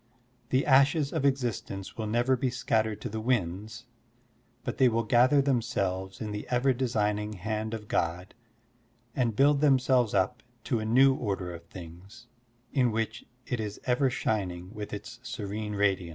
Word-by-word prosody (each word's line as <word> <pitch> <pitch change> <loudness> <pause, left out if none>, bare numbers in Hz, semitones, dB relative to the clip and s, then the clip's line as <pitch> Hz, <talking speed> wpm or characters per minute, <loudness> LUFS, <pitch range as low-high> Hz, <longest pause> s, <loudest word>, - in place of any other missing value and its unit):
The 130 +1 +2
ashes 140 +2 +4
of 140 - 0
existence 120 -7 -2
will 110 -1 -3
never 120 +4 +2
be 130 +1 0
scattered 110 -3 0
to - - -4
the 110 +1 -4
winds, 110 0 -2 0.8
but - - -4
they 130 -2 +6
will 115 0 0
gather 125 +6 +4
themselves 95 -8 -1
in 105 -1 -4
the 105 0 -5
ever 130 +2 +2
designing 105 -4 -1
hand 110 +3 -3
of 105 -2 -9
God 85 +2 -1 0.8
and 120 -4 +1
build 140 +2 +4
themselves 130 -6 +3
up 100 +5 +1 0.2
to 120 -5 0
a 110 - -3
new 130 +5 +5
order 100 -8 -3
of 85 0 -10
things, 95 +6 -12 0.5
in 125 -4 +3
which 110 +1 -3 0.2
it 120 - -3
is 105 -2 -4
ever 130 +2 +2
shining 95 -6 -2
with 105 -2 -6
its 110 +3 -7
serene 105 -3 -5
radiance. 95 -3 +1
110 Hz, 160 wpm, -29 LUFS, 100-125 Hz, 0.8 s, they